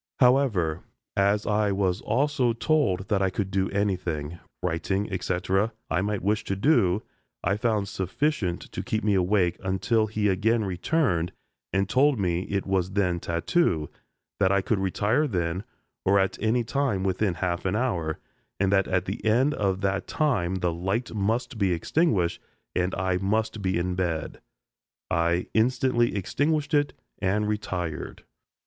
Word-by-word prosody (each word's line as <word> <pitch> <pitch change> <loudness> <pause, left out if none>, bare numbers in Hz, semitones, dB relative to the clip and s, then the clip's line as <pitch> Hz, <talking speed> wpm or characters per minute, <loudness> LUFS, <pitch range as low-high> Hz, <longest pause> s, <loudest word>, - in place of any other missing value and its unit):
However, 120 - +3 0.3
as 100 +1 +2
I 105 -1 +2
was 95 -1 0
also 130 +1 +1
told 115 -8 +1
that 100 -2 +2
I 95 - +3
could 95 +1 -3
do 95 0 +1
anything 90 -6 -2 0.2
writing, 95 +4 -1
etc. 95 +4 0 0.2
I 85 +2 +2
might 105 0 -2
wish 105 +2 +1
to 95 - -1
do, 105 - +3 0.4
I 95 +3 +2
found 105 -2 0
sufficient 95 - -1
to - - -4
keep 110 0 -2
me 105 -1 +2
awake 90 -2 +2
until 100 +4 +1
he 105 0 0
again 105 +4 +2
returned 90 - 0 0.4
and 95 0 +1
told 135 +5 +3
me 90 -1 0
it 100 -1 -1
was 95 -1 0
then 90 -4 +1
tattoo, 85 - 0 0.5
that 95 - +3
I 100 0 +3
could 105 +1 0
retire 105 +9 +1
then 90 -4 -1 0.4
or 100 +1 +4
at 95 -1 +2
any 115 +2 +2
time 125 -5 0
within 95 0 0
half 90 -1 -2
an 95 +1 0
hour, 90 -10 -1 0.4
and 100 0 +2
that 95 -1 +3
at 95 -1 0
the 95 - -5
end 125 +7 +3
of 95 -5 -1
that 100 0 -1
time 105 - 0
the 90 -2 0
light 95 +9 -2
must 115 +3 -1
be 95 -3 +2
extinguished 95 - +1 0.3
and 90 0 0
I 95 -1 0
must 110 +3 -1
be 95 -2 0
in 90 +1 -1
bed. 85 -4 -2 0.7
I 85 +2 +1
instantly 120 +1 +2
extinguished 145 - 0
it 145 -1 +2 0.3
and 100 +3 +1
retired. 90 -7 -3
100 Hz, 155 wpm, -26 LUFS, 90-110 Hz, 0.7 s, or